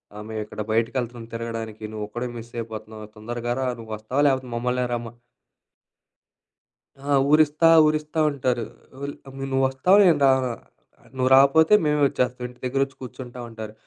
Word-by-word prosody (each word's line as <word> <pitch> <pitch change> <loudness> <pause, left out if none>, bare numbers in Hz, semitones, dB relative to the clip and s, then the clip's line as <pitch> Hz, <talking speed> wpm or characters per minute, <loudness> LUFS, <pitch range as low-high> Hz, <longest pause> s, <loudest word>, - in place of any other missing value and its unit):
ఆహ్, 105 0 -8
మేం 110 0 -4
ఇక్కడ 105 - -7
బయటకెళ్తున్నాం 115 0 -2
తిరగడానికి 115 -2 -5
నువ్వు 105 -1 -4
ఒక్కడే 120 +3 -4
మిస్ 115 +1 -10
అయిపోతున్నావు 110 -1 -7
తొందరగా 120 +2 -4
రా 130 - 0
నువ్వు 110 -1 -10
వస్తావా 120 +7 -2
లేకపోతే 130 -2 -2
మమ్మల్నే 125 +1 -1
రమ్మ" 120 -1 -5 1.9
ఆ! 140 +1 -9 0.2
ఊరిస్తా, 155 +1 +4 0.2
ఊరిస్తా 155 +1 -1
ఉంటారు. 125 -4 -1 0.4
ఉల్ 140 0 -4
అబ్ 135 - -11 0.2
"నువ్వు 135 0 +2
వస్తావా, 155 +9 +3
నేను 165 -5 +4
రానా? 130 -2 +3 0.6
నువ్వు 130 0 +1
రాకపోతే 140 +7 +5
మేమే 150 -1 +1
వచ్చేస్తాం, 125 -1 -2
ఇంటి 125 0 -16
దగ్గర 130 +2 -1
వచ్చి 135 -1 -18
కూర్చుంటాం" 125 -1 -8
అంటారు. 110 -1 -8
125 Hz, 150 wpm, -24 LUFS, 115-135 Hz, 1.9 s, రాకపోతే